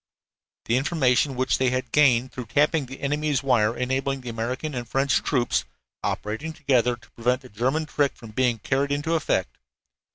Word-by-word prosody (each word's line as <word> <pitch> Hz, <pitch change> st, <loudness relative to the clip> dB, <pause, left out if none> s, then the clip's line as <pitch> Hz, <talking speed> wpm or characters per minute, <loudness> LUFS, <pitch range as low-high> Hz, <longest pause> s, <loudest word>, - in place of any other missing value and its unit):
The 115 Hz, -, +2 dB
information 135 Hz, -2 st, +2 dB
which 130 Hz, +1 st, +1 dB
they 130 Hz, -1 st, +3 dB
had 130 Hz, -1 st, -2 dB
gained 130 Hz, -4 st, +4 dB
through 125 Hz, -1 st, -7 dB
tapping 150 Hz, +3 st, +2 dB
the 130 Hz, +2 st, -10 dB
enemy's 145 Hz, -1 st, 0 dB
wire 120 Hz, -4 st, +2 dB
enabled 135 Hz, +1 st, -1 dB
the 125 Hz, -, -5 dB
American 125 Hz, +6 st, -3 dB
and 120 Hz, -2 st, -5 dB
French 135 Hz, +1 st, +2 dB
troops, 120 Hz, -, +1 dB, 0.4 s
operating 110 Hz, +10 st, -3 dB
together, 125 Hz, -6 st, +2 dB
to 115 Hz, -1 st, -21 dB
prevent 125 Hz, +2 st, 0 dB
the 130 Hz, -, -12 dB
German 130 Hz, +9 st, 0 dB
trick 145 Hz, -2 st, 0 dB
from 115 Hz, -3 st, -12 dB
being 125 Hz, +1 st, +1 dB
carried 135 Hz, +6 st, -1 dB
into 145 Hz, +3 st, 0 dB
effect. 140 Hz, -, 0 dB
130 Hz, 170 wpm, -25 LUFS, 120-140 Hz, 0.4 s, gained